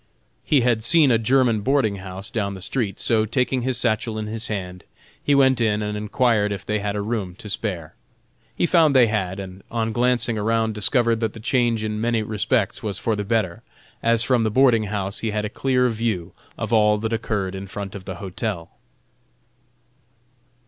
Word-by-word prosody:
He 145 -4 +3
had 120 -2 +1
seen 150 +2 +5
a 115 - +4
German 120 -2 +2
boarding 120 -4 +1
house 95 +3 -8
down 100 -4 -2
the - - -8
street, 100 -1 -2
so 110 -2 +2
taking 125 +2 0
his 130 0 0
satchel 115 -2 0
in 110 - -3
his 110 +2 -3
hand, 90 -3 -5 0.4
he 145 - +3
went 130 -3 +4
in 105 -2 +1
and 105 0 -3
enquired 105 0 +1
if 100 -1 -5
they 105 0 -1
had 100 0 -3
a 100 - -2
room 105 -5 -3
to 110 +2 -11
spare. 95 -6 -4 0.6
He - - +1
found 165 -5 +4
they 125 -2 +7
had, 100 -4 -2
and 95 0 -8
on 115 -1 -1
glancing 120 -1 +1
around 110 +1 +1
discovered 115 +2 +2
that 110 -2 -1
the - - -10
change 120 -1 +1
in 105 0 -3
many 115 -1 +1
respects 105 0 -1
was 105 -4 -3
for 110 +2 -1
the 105 - -3
better, 105 -5 -1 0.4
as 115 0 +3
from 125 -2 +2
the 110 - +1
boarding 115 -2 +4
house 100 -1 -3
he 115 - -2
had 105 0 -2
a - - -3
clear 125 +1 +1
view 110 -7 -2 0.2
of - - -3
all 105 -1 +4
that 110 +2 -3
occurred 105 -4 -2
in 95 0 -6
front 100 0 -6
of 95 -2 -9
the 95 - -5
hotel. 95 -2 -5
110 Hz, 195 wpm, -22 LUFS, 100-120 Hz, 0.6 s, they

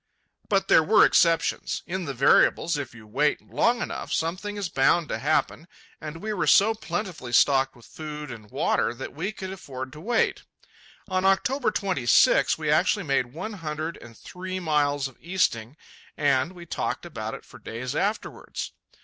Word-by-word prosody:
But 195 -2 +2
there - - +6
were 205 +7 +6
exceptions. 165 -1 +2
In 185 0 -4
the 140 - -4
variables, 145 +5 +4
if 135 -5 -5
you 110 -2 -13
wait 140 +8 +1
long 240 +1 0
enough, - - -6
something 185 +6 -2
is 200 -2 -2
bound 155 +2 +2
to - - -2
happen, 155 +4 0 0.3
and 155 +3 -7
we 215 0 -2
were 185 -5 -1
so 215 +3 +6
plentifully 185 - -5
stocked 135 +2 +4
with 120 - -17
food 150 -2 -7
and 110 -3 -10
water 115 - 0
that 130 - -7
we 175 +8 -3
could 190 -3 -7
afford 130 -8 -7
to 150 - -10
wait. 230 +4 +1 0.7
On 185 -1 0
October 240 +7 +2
26, 180 - +3
we 155 -2 -1
actually 185 +5 +2
made 135 -3 +1
one 215 +8 -5
hundred 160 -3 -4
and 115 -1 -13
three 185 +1 -6
miles 145 -4 +1
of 135 - -16
easting, 155 -8 -1 0.4
and 140 +2 +2
we 175 -1 -11
talked - - -3
about - - -5
it - - -12
for - - -14
days 125 +4 -5
afterwards. 205 +6 -3
160 Hz, 170 wpm, -25 LUFS, 135-190 Hz, 0.7 s, there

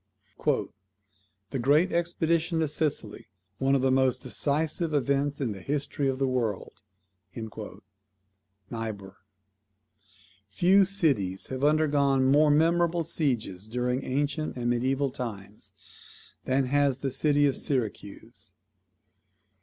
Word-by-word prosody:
"The 135 - -2
great 150 +8 +3
expedition 170 -1 0
to 160 - +1
Sicily, 150 -7 -3 0.3
one 135 +1 +2
of 135 - +1
the 130 - +3
most 130 -1 +2
decisive 155 +4 -1
events 140 +1 0
in 130 -6 -1
the 95 -2 -7
history 145 0 -2
of 130 - -2
the 135 - +1
world." 115 -6 -2 1.9
NIEBUHR. 110 -4 -5 1.4
Few 190 - +4
cities 135 - 0
have 130 +1 -4
undergone 145 -3 +3
more 150 +2 +5
memorable 170 +3 +3
sieges 120 - -2
during 125 +3 -1
ancient 145 +3 -2
and 120 0 0
mediaeval 130 +3 0
times, 105 -5 -10
than 130 +1 +1
has 140 0 +2
the 135 -1 -3
city 145 +1 +2
of 140 - +2
Syracuse. 110 -5 -4
135 Hz, 110 wpm, -27 LUFS, 120-150 Hz, 1.9 s, more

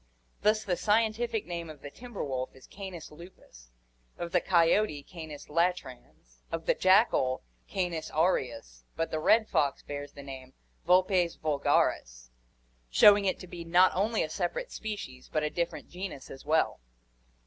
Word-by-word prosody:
Thus 215 +1 +3
the 185 -4 0
scientific 220 +1 +1
name 170 -2 -5
of 150 -3 -11
the 145 - -7
timber 240 0 -7
wolf 130 -2 -4
is 130 - -15
Cants 190 -6 -9
lupus, 150 - -15 0.5
of 170 -1 -5
the 180 - +3
coyote 170 -3 +3
Cants 160 -4 -9
latrans, 150 - -3
of 165 0 -4
the - - +4
jackal 185 - +3 0.2
Cants 175 -4 -2
aureus; 120 - -1
but 165 - -2
the 155 - -1
red 220 +7 +4
fox 140 -2 0
bears 145 0 -6
the 140 - -10
name 130 -1 -9 0.3
Vulpes 180 -1 +3
vulgaris, - - 0 0.6
showing 205 - +7
it 190 - +1
to 185 - -9
be 175 -1 -7
not 175 +2 +5
only 215 +4 +1
a 155 - -4
separate 190 - -3
species 195 -13 -6
but 155 - 0
a 150 - -1
different 170 0 -3
genus 180 -6 -7
as 135 - -10
well. 155 +2 +1
170 Hz, 155 wpm, -29 LUFS, 140-190 Hz, 0.6 s, showing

